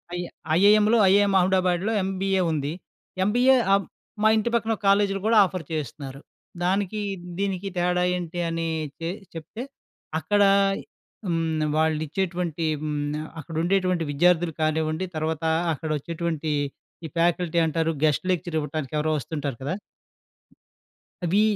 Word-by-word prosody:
I - - -2 0.4
ఐఐఎంలో 210 +4 +5
IIM 200 0 +4
అహ్మదాబాద్‌లో 185 +2 +2
MBA 190 0 0
ఉంది. 150 -1 -2 0.5
MBA 245 +6 +4
హ్మ్. 195 0 +3 0.4
మా - - +6
ఇంటి 220 +2 +1
పక్కన 225 -1 +1
కాలేజీలు 195 0 +3
గూడా 225 0 +4
ఆఫర్ 185 -2 -5
చేస్తున్నారు. 140 -2 -5 0.4
దానికి, 200 +3 0 0.4
దీనికి 195 -1 -1
తేడా 180 0 +2
ఏంటి 175 0 -5
అని 165 0 -2 0.3
తేల్చి 180 +5 -5
చెప్తే 165 +9 -7 0.6
అక్కడ 205 +7 +1 0.9
హ్మ్. 165 -2 0
వాళ్ళు 160 -1 +2
ఇచ్చేటువంటి 175 -1 -2 0.2
హ్మ్. 150 -1 -2 0.4
అక్కడ 160 +1 -8
ఉండేటువంటి 185 -1 +1
విద్యార్థులు 175 +2 +3
కానివ్వండి, 155 +2 0
తర్వాత 155 0 -2 0.3
అక్కడ 155 +2 -5
వచ్చేటువంటి 165 0 -3 0.5
ఈ - - -3
ఫ్యాకల్టీ 170 0 +1
అంటారు 160 0 0
గెస్ట్ 155 +3 +2
లెక్చర్ 175 -2 -2
ఇవ్వటానికి 150 -1 -4
ఎవరో 155 +1 +1
వస్తుంటారు 145 -3 -4
కదా! 140 +6 -2 1.5
అవి 185 +5 +3
175 Hz, 125 wpm, -25 LUFS, 155-195 Hz, 1.5 s, మా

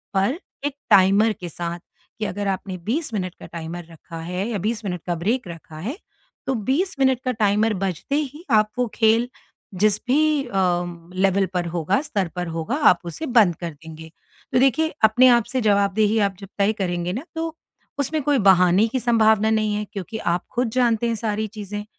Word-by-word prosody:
पर 200 - +1 0.3
एक 290 -1 -2 0.2
टाइमर 200 +3 +5
के 175 - -5
साथ 170 +1 -5 0.4
कि 215 - -1
अगर 200 0 -3
आपने 190 -1 -3
20 270 +3 -2
मिनट 185 -4 -3
का - - -8
टाइमर 170 +1 -7
रखा 165 +1 -11
है 180 +5 -3
या 215 - -2
20 220 +3 -2
मिनट 180 -3 -3
का 175 - 0
ब्रेक 210 +6 -1
रखा 165 -2 -10
है। 230 - -4 0.5
तो 270 - +1 0.2
20 365 +7 +1
मिनट 265 -2 +3
का 255 - +1
टाइमर 215 0 +2
बजते 190 - -2
ही 295 +2 -3
आप 215 -1 +4
वो 245 - +2
खेल 225 +2 +3 0.5
जिस 210 +2 +3
भी 300 +1 +3
अ, - - -12
लेवल 180 +1 0
पर 180 -1 0
होगा, 175 - 0
स्तर 205 - -2
पर 175 -1 -3
होगा, 165 - -2
आप 235 - +5
उसे 170 - -5
बंद 220 - +4
कर 170 -2 -4
देंगे। 160 +1 -12 0.4
तो 250 - +4
देखिए 275 +5 +2
अपने 220 +4 +6
आप 235 - 0
से 255 - +1
जवाबदेही 205 +1 +2
आप 195 - -8
जब 195 -1 -10
तय 200 +2 +3
करेंगे 175 -1 -1
न 250 +8 -4
तो 325 0 -3 0.4
उसमें 305 +2 0
कोई 290 -1 +2
बहाने 185 +4 +4
की 260 +3 -1
संभावना 220 -2 +3
नहीं 215 -1 +1
है 210 0 -2
क्योंकि 200 +3 -5 0.2
आप 175 - -3
खुद 245 -1 +1
जानते 235 -2 +2
हैं 230 - 0
सारी 215 0 -1
चीजें 205 +1 -5
210 Hz, 195 wpm, -22 LUFS, 180-240 Hz, 0.5 s, अपने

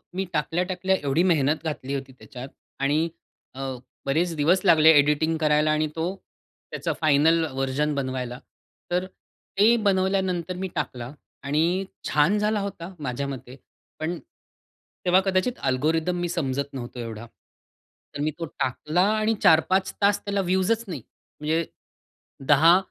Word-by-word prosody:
मी 190 - -1
टाकल्या-टाकल्या, 180 +4 0
एवढी 145 +5 +2
मेहनत 155 -3 +2
घातली 145 -4 -4
होती 135 -1 -5
त्याच्यात 130 +1 -9 0.3
आणि 155 +4 +2 0.5
अ, - - -9 0.5
बरेच 165 +4 +1
दिवस 165 +6 +3
लागले 160 -2 +7
एडिटिंग 150 +3 +3
करायला 150 -1 +2
आणि 155 0 +1
तो 170 +4 -2 0.6
त्याचा - - -2
फायनल 155 +2 +4
व्हर्जन 135 +3 -1
बनवायला. 130 -2 -3 0.5
तर 180 +1 +1 0.5
ते 220 +4 +6
बनवल्यानंतर 185 -2 +1
मी 190 +1 -3
टाकला 125 -4 -4 0.3
आणि 165 +7 +1 0.2
छान 150 +8 +3
झाला 210 0 +1
होता 190 -2 -6
माझ्या 140 0 -3
मते. 130 -2 -7 0.4
पण 170 +3 -2 0.9
तेव्हा 180 +1 +5
कदाचित 195 +6 0
अल्गोरिदम 160 +7 +1
मी 175 - -1
समजत 140 -5 -2
नव्हतो 125 -1 -7
एवढा. 115 -1 -6 0.9
तर 145 - -3
मी 155 +1 0
तो 165 - -2
टाकला 150 +4 -1 0.2
आणि 215 +1 +2
4-5 185 +4 +4
तास 200 0 +4
त्याला 200 -1 0
व्ह्यूजच 190 +5 +1
नाही. 160 -8 -5 0.4
म्हणजे 160 +2 0 0.8
10 160 +5 +7
160 Hz, 135 wpm, -25 LUFS, 140-185 Hz, 0.9 s, लागले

